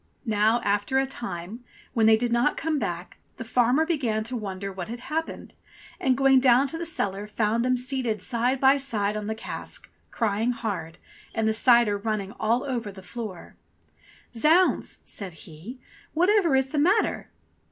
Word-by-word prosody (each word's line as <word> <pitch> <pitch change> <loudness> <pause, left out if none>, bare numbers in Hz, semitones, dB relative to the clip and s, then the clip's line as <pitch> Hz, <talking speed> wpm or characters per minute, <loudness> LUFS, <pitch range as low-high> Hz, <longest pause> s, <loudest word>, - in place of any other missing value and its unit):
Now 220 +1 +2
after 205 +5 +1
a 270 - +3
time, 230 -3 -7 0.3
when 225 -3 +3
they 220 0 +6
did 240 +1 -1
not 240 +5 +2
come 315 -2 -1
back, 175 -5 -5 0.2
the - - -5
farmer 245 +6 +2
began 250 -10 0
to 240 +3 -4
wonder 195 -3 -5
what 185 -2 -6
had 235 +1 -6
happened, 320 +4 -4 0.5
and 260 -1 +2
going 270 -1 +5
down 255 +1 +5
to 325 - -5
the 340 - -4
cellar 205 - -2
found 215 +2 0
them 255 0 +2
seated 250 -4 -1
side 245 +5 0
by 270 +1 +5
side 215 -7 -1
on 210 -1 -4
the 220 - -2
cask, 220 - -5 0.2
crying 225 +2 0
hard, 180 -8 -5 0.4
and 220 -1 +1
the 220 - +2
cider 230 -3 +4
running 205 -2 -2
all 230 +3 +1
over 240 -6 -3
the 190 -1 -12
floor. 195 -1 -8 0.8
"Zounds 325 +9 +3
!" - - -37
says 195 -4 -5
he, 175 - -10 0.4
"whatever 355 -3 +3
is 265 0 +2
the 295 - -1
matter 375 +9 +2
235 Hz, 175 wpm, -26 LUFS, 205-265 Hz, 0.8 s, they